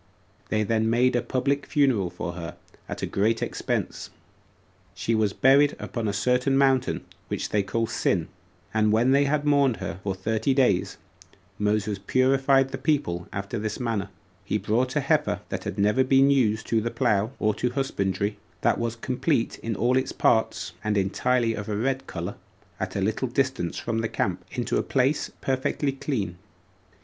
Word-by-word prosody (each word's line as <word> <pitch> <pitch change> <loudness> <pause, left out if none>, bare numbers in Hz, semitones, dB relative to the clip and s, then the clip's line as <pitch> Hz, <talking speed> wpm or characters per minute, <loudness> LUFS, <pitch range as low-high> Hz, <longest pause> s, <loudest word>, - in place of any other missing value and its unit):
They 110 0 +1
then 110 +1 +1
made 125 +2 +3
a 120 - +2
public 135 +3 -1
funeral 130 - +2
for 85 - -5
her, 85 -1 -7 0.3
at - - -5
a - - +2
great 110 +3 +1
expense. - - -3 0.9
She 115 - -1
was 110 -2 +2
buried 140 +6 +4
upon 115 -3 -4
a - - +1
certain 125 +4 +1
mountain, 135 -2 +2 0.2
which - - -3
they 105 - +2
call 105 +4 -1
Sin: - - 0 0.5
and 110 -1 +3
when 115 +4 +3
they 140 +1 +4
had 145 +1 0
mourned 140 -5 +3
for - - -5
her 100 - -1
thirty 110 +6 0
days, 125 -9 +2 0.6
Moses 105 -1 0
purified 135 +4 +3
the 135 0 -5
people 135 - 0
after 100 +3 -4
this 110 0 -3
manner: 110 -5 -2 0.3
He 105 - -1
brought 120 +5 0
a - - +2
heifer - - +1
that - - -4
had 95 - -4
never 105 +6 +3
been 135 +1 +4
used 110 -6 +2
to 115 -1 +2
the 115 - -1
plough 110 -2 +1
or 105 -1 +1
to 125 - -1
husbandry, 105 -6 -1 0.2
that - - +2
was 115 0 -2
complete 125 +2 -1
in 115 -1 -3
all 120 +5 +2
its 130 - 0
parts, 95 -6 +1
and 105 -1 0
entirely 115 +5 +1
of 105 -1 -5
a 105 - -1
red 135 +4 -1
color, 85 +3 -4 0.5
at - - -4
a 100 - 0
little 110 +6 0
distance 130 -8 -1
from 115 - -2
the 115 0 -1
camp, 90 -2 -2
into 125 -2 -1
a - - +2
place 135 +2 +1
perfectly 135 +2 0
clean. 110 - -3
115 Hz, 175 wpm, -26 LUFS, 105-130 Hz, 0.9 s, buried